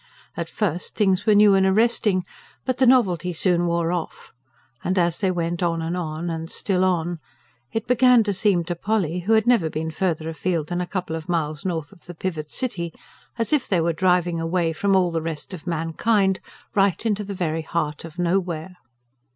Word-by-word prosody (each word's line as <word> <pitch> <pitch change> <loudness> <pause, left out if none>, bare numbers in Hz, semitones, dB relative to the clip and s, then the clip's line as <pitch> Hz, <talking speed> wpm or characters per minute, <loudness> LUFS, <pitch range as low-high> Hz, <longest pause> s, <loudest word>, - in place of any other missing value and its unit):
At - - -4
first, 180 -5 -2
things 195 -1 +1
were 215 - +6
new 205 -1 +7
and 195 0 +4
arresting, 205 -1 +2 0.4
but 255 -1 -1
the 260 - +5
novelty 180 -9 +3
soon 175 +1 +2
wore 170 0 0
off; 175 -2 -5 0.5
and 185 +2 0
as 175 -2 +1
they 195 - +1
went 170 -1 -2
on 170 -1 +1
and 165 +2 -2
on, 165 -1 -4
and 165 -1 -4
still 185 -2 0
on, 175 -2 0 0.5
it 225 -1 -2
began 250 -1 +5
to 205 -1 -1
seem 190 -2 +2
to 175 +1 -3
Polly, 180 -3 -1
who 200 +6 +1
had 220 -1 +4
never 235 -10 +3
been 160 +1 -3
farther 160 -2 -1
afield 165 -1 -2
than 175 0 -1
a 180 - -3
couple 180 -4 -3
of 160 +2 -7
miles 155 -2 -1
north 165 -5 -3
of 170 - -19
the 175 +1 -9
"Pivot 160 -3 -4
City," 170 -9 -3 0.5
as 230 +6 -1
if 290 -4 +2
they 185 - +2
were 165 0 +1
driving 175 -1 +1
away 165 0 0
from 195 +4 +1
all 180 -2 +3
the 165 -1 -1
rest 160 +3 -5
of 180 -1 -9
mankind, 190 +4 +1 0.3
right 200 +1 +2
into 210 -2 0
the 200 0 -6
very 165 -3 -1
heart 155 -2 -3
of 165 0 -10
nowhere. 175 -1 -1
175 Hz, 200 wpm, -23 LUFS, 165-195 Hz, 0.5 s, new